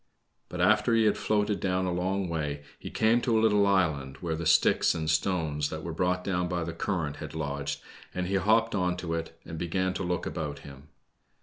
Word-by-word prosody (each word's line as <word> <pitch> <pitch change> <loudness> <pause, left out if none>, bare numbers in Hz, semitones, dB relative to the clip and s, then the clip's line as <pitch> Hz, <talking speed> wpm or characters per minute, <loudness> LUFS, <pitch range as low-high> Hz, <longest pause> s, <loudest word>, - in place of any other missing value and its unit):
But - - -4
after 115 - +4
he 115 - +4
had 105 - +3
floated 105 -1 0
down 95 0 0
a 90 - 0
long 95 +2 -1
way, 75 -3 -3 0.2
he - - -7
came 115 +2 +3
to 115 -2 +2
a - - +4
little 105 -2 +4
island, 80 -9 +1
where 85 -3 -2
the 85 0 -3
sticks - - +4
and 80 -1 -3
stones 80 -3 0
that 80 0 -6
were 85 - -4
brought 90 +2 0
down 90 -2 0
by 90 -1 -2
the 85 0 -4
current 80 -4 -2
had - - -8
lodged, 70 -2 -3 0.3
and 90 - -2
he 95 - -3
hopped 110 +4 +3
on 90 -2 0
to 85 -2 -3
it 80 0 -4
and 80 -1 -7
began 95 +2 0
to 95 - -3
look 90 0 -1
about 75 -4 -4
him. 70 +1 -12
90 Hz, 215 wpm, -28 LUFS, 80-95 Hz, 0.3 s, after